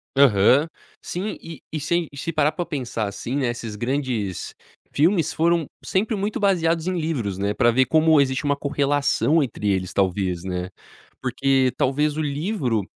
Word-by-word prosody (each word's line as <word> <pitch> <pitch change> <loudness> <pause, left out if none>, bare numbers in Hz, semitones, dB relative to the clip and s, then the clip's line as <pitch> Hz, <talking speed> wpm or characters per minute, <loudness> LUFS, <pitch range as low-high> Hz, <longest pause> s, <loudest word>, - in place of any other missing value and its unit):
Aham. 135 +3 +5 0.3
Sim, 195 +5 -4
e 165 -1 -10
e 155 - -3
sem 170 +3 0
e 140 - -12
se 165 - -3
parar 150 -1 +2
pra 175 - -4
pensar, 125 -8 -3
assim, 115 +5 -5
né, 135 - 0
esses 115 -3 -5
grandes 120 - -2 0.4
filmes 165 +1 +2
foram 165 -1 +1 0.2
sempre 215 +4 0
muito 205 +1 -2
baseados 170 -5 +1
em 180 -2 0
livros, 120 - -2
né. 100 +1 0
Pra 120 +3 +3
ver 130 +3 +3
como 155 +2 +4
existe 130 +1 -1
uma 145 0 +2
correlação 145 +2 +1
entre 110 -6 -2
eles, 95 -2 -1
talvez, 95 -2 0
né. 90 -1 -3 0.5
Porque 130 0 +1
talvez 145 +3 +1
o 155 - -1
livro 145 - -1
140 Hz, 165 wpm, -23 LUFS, 115-160 Hz, 0.5 s, Aham